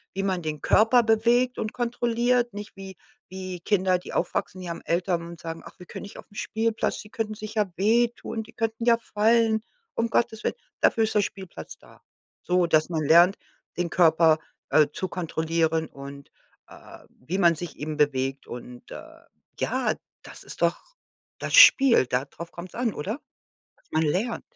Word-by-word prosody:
wie 195 Hz, -, -1 dB
man 190 Hz, -2 st, -1 dB
den 155 Hz, -2 st, -4 dB
Körper 230 Hz, +3 st, +4 dB
bewegt 235 Hz, +3 st, +2 dB
und 215 Hz, -, -3 dB
kontrolliert, 240 Hz, -1 st, 0 dB
nicht 205 Hz, +1 st, -8 dB
wie 195 Hz, -1 st, -10 dB, 0.3 s
wie 185 Hz, -1 st, -6 dB
Kinder, 185 Hz, 0 st, +1 dB
die -, -, -10 dB
aufwachsen, 185 Hz, -, -2 dB
die 180 Hz, -1 st, -6 dB
haben 170 Hz, -, -7 dB
Eltern 175 Hz, 0 st, 0 dB
und 170 Hz, -1 st, -10 dB
sagen: 165 Hz, 0 st, -6 dB
„Ach, -, -, -13 dB
wir 180 Hz, -, -12 dB
können -, -, -8 dB
nicht 200 Hz, -, -10 dB
aufm -, -, -14 dB
Spielplatz, 225 Hz, +1 st, -1 dB
sie 210 Hz, -, -10 dB
könnten 220 Hz, -3 st, -3 dB
sich 215 Hz, 0 st, -8 dB
ja 210 Hz, -4 st, 0 dB
wehtun, 230 Hz, +3 st, +1 dB
die 225 Hz, +1 st, -13 dB
könnten 225 Hz, 0 st, -2 dB
ja 235 Hz, -1 st, +5 dB
fallen.“ 225 Hz, 0 st, +2 dB, 0.3 s
Um 230 Hz, 0 st, -1 dB
Gottes 225 Hz, -1 st, 0 dB
willen, -, -, -1 dB, 0.3 s
dafür 225 Hz, -, +3 dB
ist 220 Hz, -, 0 dB
der 210 Hz, -, +4 dB
Spielplatz 195 Hz, -2 st, -7 dB
da. -, -, -20 dB, 0.4 s
So, 180 Hz, 0 st, +2 dB
dass 155 Hz, -1 st, +2 dB
man 160 Hz, -3 st, -1 dB
lernt, 170 Hz, +6 st, +6 dB, 0.4 s
den 175 Hz, -2 st, -1 dB
Körper, 160 Hz, -2 st, +4 dB, 0.3 s
äh, 155 Hz, -1 st, +5 dB
zu 185 Hz, -, -3 dB
kontrollieren 165 Hz, -2 st, -1 dB
und, 140 Hz, 0 st, -11 dB, 0.4 s
äh, -, -, -14 dB
wie 165 Hz, +9 st, -6 dB
man 170 Hz, -3 st, +5 dB
sich 170 Hz, +1 st, -7 dB
eben 150 Hz, +1 st, -5 dB
bewegt. 135 Hz, -2 st, 0 dB
Und, 120 Hz, 0 st, -10 dB
äh, -, -, -11 dB, 0.4 s
ja, -, -, 0 dB, 0.3 s
das -, -, -11 dB
ist -, -, -5 dB
doch 170 Hz, 0 st, +2 dB, 0.6 s
das -, -, -5 dB
Spiel, 270 Hz, -, +8 dB
da 125 Hz, +2 st, 0 dB
drauf 165 Hz, +4 st, -10 dB
kommt's 175 Hz, +1 st, -10 dB
an, 235 Hz, -3 st, -1 dB
oder? 210 Hz, -, -4 dB, 0.7 s
Man 160 Hz, -, +1 dB
lernt. 195 Hz, +10 st, -1 dB
190 Hz, 175 wpm, -25 LUFS, 165-225 Hz, 0.7 s, Spiel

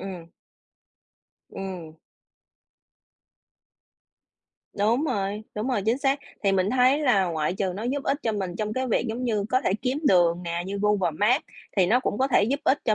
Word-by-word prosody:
ừm. 180 Hz, -4 st, -8 dB, 1.2 s
Ừm. 180 Hz, -5 st, -7 dB, 2.8 s
Đúng 230 Hz, +8 st, +2 dB
rồi, 210 Hz, -5 st, -2 dB
đúng 215 Hz, +4 st, -2 dB
rồi, 240 Hz, -6 st, 0 dB
chính 230 Hz, +4 st, +2 dB
xác. 275 Hz, 0 st, +1 dB, 0.2 s
Thì 195 Hz, -, +2 dB
mình 190 Hz, +1 st, +1 dB
thấy 255 Hz, +2 st, +4 dB
là 245 Hz, -11 st, +3 dB
ngoại 160 Hz, -1 st, -1 dB
trừ 190 Hz, -1 st, -1 dB
nó 210 Hz, -, -5 dB
giúp 275 Hz, +4 st, -2 dB
ích 275 Hz, -, 0 dB
cho 225 Hz, -, 0 dB
mình 190 Hz, -4 st, -3 dB
trong 215 Hz, -1 st, -2 dB
cái 260 Hz, +3 st, -1 dB
việc 245 Hz, +1 st, 0 dB
giống 240 Hz, +3 st, -3 dB
như 215 Hz, -4 st, 0 dB
có 255 Hz, +2 st, +2 dB
thể 190 Hz, -, 0 dB
kiếm 260 Hz, +2 st, 0 dB
đường 175 Hz, -1 st, +3 dB
nè, 170 Hz, 0 st, -3 dB
như 200 Hz, +1 st, -4 dB
Google 210 Hz, -4 st, +2 dB
Maps 215 Hz, -, +2 dB, 0.3 s
thì 185 Hz, -3 st, +4 dB
nó 235 Hz, +7 st, +3 dB
cũng 210 Hz, -, -2 dB
có 265 Hz, -, +3 dB
thể 235 Hz, -, +4 dB
giúp 275 Hz, +6 st, -1 dB
ích 290 Hz, -1 st, +3 dB
cho 215 Hz, -, +3 dB
210 Hz, 185 wpm, -25 LUFS, 190-255 Hz, 2.8 s, thấy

